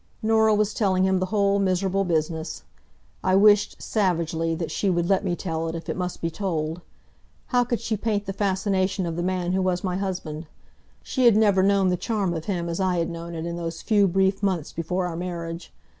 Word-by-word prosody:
Norah 220 -1 +4
was 210 0 +1
telling 190 -4 +1
him 190 -1 +2
the 185 - -1
whole 200 -1 +2
miserable 195 0 +1
business. 160 -2 -2 0.6
I 185 0 +3
wished, 205 +1 +4
savagely, 165 -5 0
that 165 0 -4
she 200 - 0
would 175 -1 +1
let 195 +1 +2
me 180 -3 0
tell 165 -2 -3
it, 165 - -4
if 165 - -7
it - - -1
must 180 -1 -4
be 165 - -1
told. 165 -3 -3 0.7
How 245 -1 +3
could 240 -1 -2
she 230 -1 -2
paint 210 -1 -1
the 195 - -4
fascination 190 -1 0
of 165 -1 -3
the 175 - -2
man 180 0 -1
who 190 +1 +1
was 180 -1 0
my 180 -1 -1
husband? 175 -5 -4 0.6
She 260 -2 0
had 230 -3 +6
never 205 -3 +4
known 195 -1 +3
the 180 - +1
charm 200 -3 -1
of 160 -1 -5
him 175 -4 -2
as 170 +1 -3
I 185 -2 +1
had 170 0 -1
known 170 0 -7
it 160 0 -4
in 170 0 -4
those 165 -1 -5
few 205 -3 +4
brief 190 +2 +1
months 185 -6 -1
before 180 +3 -2
our 175 -2 -4
marriage. 170 -1 -5
185 Hz, 215 wpm, -24 LUFS, 170-200 Hz, 0.7 s, had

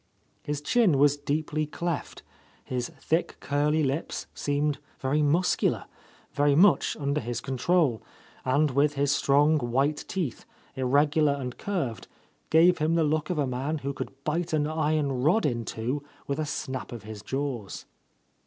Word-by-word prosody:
His 145 -1 -3
chin 225 - +3
was 145 +1 +5
deeply 150 +1 -2
cleft, 170 +1 -4 0.4
his 125 -1 -3
thick 165 +2 -1
curly 150 +3 +1
lips 140 +3 -2
seemed 145 0 -1 0.2
very 140 +3 0
muscular, 165 +5 +2 0.5
very 145 0 +3
much 185 +5 +4
under 140 +1 0
his 120 0 -3
control, 135 -1 +1 0.4
and, 145 +3 +2
with 145 +2 +2
his 140 0 +1
strong 145 +2 +3
white 135 +4 0
teeth, 170 - -3 0.3
irregular 145 +3 +3
and 130 -3 -5
curved, 165 - -3 0.4
gave 170 +3 +5
him 155 +2 +2
the 165 - +3
look 155 0 0
of 180 - -1
a 145 - +2
man 135 +5 -2
who 140 - -1
could 135 0 -7
bite 165 +3 -1
an 150 -1 +2
iron 150 -4 0
rod 165 - +3
in 120 -5 -1
two 125 +6 -3 0.2
with 140 +2 -2
a 155 - -1
snap 130 -2 -4
of 120 -4 -7
his 105 -1 -8
jaws. 130 -5 -4
145 Hz, 155 wpm, -27 LUFS, 135-155 Hz, 0.5 s, was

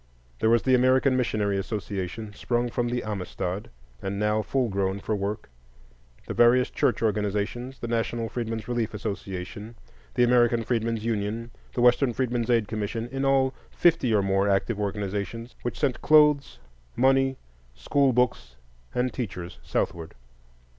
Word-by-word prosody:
There 110 - +3
was 115 0 +4
the 130 - +3
American 130 +1 +4
Missionary 105 -5 0
Association, 105 0 -4
sprung 120 +3 -1
from 120 0 -1
the 120 0 -2
Amistad, 95 -2 -4 0.3
and 95 +1 -3
now 105 +1 +1
full 125 +4 0
grown 95 -1 -1
for 110 +2 -2
work; 105 +2 -3 0.8
the - - -4
various 125 +1 +4
church - - +1
organizations, 105 +4 -1
the 120 - -5
National 115 0 -1
Freedmen's 115 -1 -4
Relief 120 -3 -2
Association, 100 +1 -5 0.4
the 125 - +4
American 120 -1 +4
Freedmen's 115 -2 -1
Union, 115 +1 -2 0.2
the 120 - 0
Western 125 +1 +4
Freedmen's 120 -1 -1
Aid 115 -4 +3
Commission,—in 115 +5 -3
all 135 -1 +3 0.2
fifty 165 -8 +2
or 105 -2 +3
more 95 +1 +2
active 100 +2 +1
organizations, 105 +3 -3
which 120 - -4
sent 140 -4 0
clothes, 150 -2 +4 0.4
money, 135 +1 +3 0.4
school 140 - +2
books, 125 - 0 0.4
and 125 +1 0
teachers 90 -8 -5
southward. 85 -1 -3
115 Hz, 140 wpm, -26 LUFS, 105-125 Hz, 0.8 s, was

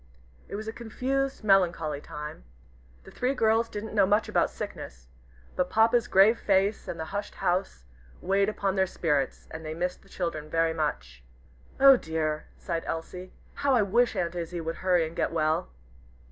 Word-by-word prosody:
It - - -6
was 215 +1 -6
a 220 - -4
confused, 265 +3 -2
melancholy 170 -7 +2
time. 150 - -8 0.6
The - - -13
three 255 +2 -1
girls 225 -1 +2
didn't 210 +1 -6
know 200 -3 +4
much 210 +3 +2
about - - +2
sickness, 60 0 -8 0.5
but 180 0 0
Papa's 225 +3 +3
grave 200 +5 +5
face, 200 +1 +1
and 170 - -5
the 160 - -3
hushed 205 0 -4
house, 175 - -1 0.3
weighed 195 +2 +1
upon 200 -2 -1
their 190 -1 +2
spirits, 145 -7 -1
and 160 0 -7
they 155 0 -5
missed 180 +2 -3
the 195 - -22
children 155 -5 -4
very 165 0 +1
much. 65 - -3 0.6
"Oh 270 -1 +8
dear!" 155 -4 -2
sighed 165 -2 -4
Elsie. 180 +3 -5 0.2
"How 280 -2 +1
I 230 - +4
wish 235 +5 +2
Aunt 170 -1 -1
Izzie 175 0 -4
would 165 0 -4
hurry 180 -3 +2
and 160 +1 -8
get - - 0
well." 155 - 0
180 Hz, 175 wpm, -27 LUFS, 160-215 Hz, 0.6 s, Oh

